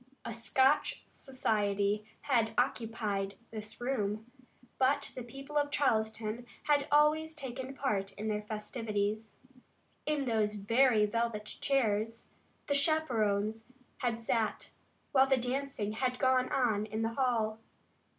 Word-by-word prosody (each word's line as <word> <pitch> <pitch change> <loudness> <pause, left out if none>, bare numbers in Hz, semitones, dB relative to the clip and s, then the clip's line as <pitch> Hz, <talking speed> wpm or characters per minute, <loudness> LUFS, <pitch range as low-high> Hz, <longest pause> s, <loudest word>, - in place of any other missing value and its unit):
A 235 - -3
Scotch 260 +6 +2
society 210 -5 0 0.2
had 235 -6 +2
occupied 220 -5 0 0.2
this 215 -1 -7
room, 220 -4 -1 0.5
but 280 +2 +2
the 255 - -6
people 275 +5 -6
of 290 0 0
Charleston 220 -4 0 0.2
had 290 -1 +2
always 305 +2 +4
taken 265 -2 -6
part 200 -8 -1
in 210 +2 -5
their 210 -1 0
festivities. 210 0 -3 0.7
In 300 -2 +1
those 215 -3 +1
very 225 +2 +4
velvet 230 -1 -1
chairs 225 -3 0 0.4
the 285 - 0
chaperons 225 -8 +1 0.3
had 235 -2 -1
sat 225 -1 -1 0.4
while 270 -1 +5
the 265 -1 +4
dancing 250 -3 -2
had 250 +3 -1
gone 255 -1 +2
on 215 -5 +1
in 220 +1 -2
the 225 0 -1
hall. 230 -4 +1
230 Hz, 120 wpm, -32 LUFS, 215-270 Hz, 0.7 s, while